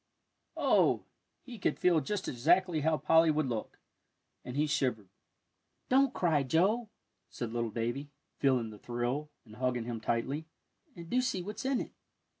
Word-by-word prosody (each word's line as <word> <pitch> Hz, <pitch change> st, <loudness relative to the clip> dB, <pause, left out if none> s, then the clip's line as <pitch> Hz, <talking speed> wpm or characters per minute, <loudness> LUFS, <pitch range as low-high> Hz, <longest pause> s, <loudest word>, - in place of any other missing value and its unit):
Oh, -, -, +3 dB, 0.4 s
he 240 Hz, -4 st, -10 dB
could -, -, 0 dB
feel 175 Hz, -3 st, +4 dB
just 205 Hz, +4 st, -3 dB
exactly 170 Hz, +6 st, +2 dB
how 155 Hz, +1 st, +2 dB
Polly 160 Hz, +3 st, +4 dB
would 155 Hz, -1 st, +2 dB
look, 115 Hz, -4 st, -4 dB, 0.7 s
and 125 Hz, +2 st, -6 dB
he 150 Hz, -, +3 dB
shivered. 125 Hz, -9 st, -1 dB, 0.8 s
"Don't 270 Hz, 0 st, +4 dB
cry, 165 Hz, -, +2 dB
Joe," 195 Hz, -, +2 dB, 0.4 s
said 115 Hz, -2 st, -5 dB
little 120 Hz, -1 st, -1 dB
Davie, 120 Hz, +6 st, -3 dB, 0.3 s
feeling 125 Hz, -5 st, +2 dB
the 105 Hz, -, -12 dB
thrill, 120 Hz, +6 st, -2 dB, 0.2 s
and 110 Hz, -1 st, -14 dB
hugging 125 Hz, -2 st, -1 dB
him 115 Hz, -2 st, -4 dB
tightly; 135 Hz, +8 st, -1 dB, 0.5 s
"and 170 Hz, -1 st, -9 dB
do 250 Hz, +8 st, +2 dB
see 190 Hz, -7 st, -1 dB
what's 210 Hz, +6 st, -6 dB
in 265 Hz, -1 st, +1 dB
it." -, -, -7 dB
150 Hz, 155 wpm, -31 LUFS, 120-180 Hz, 0.8 s, feel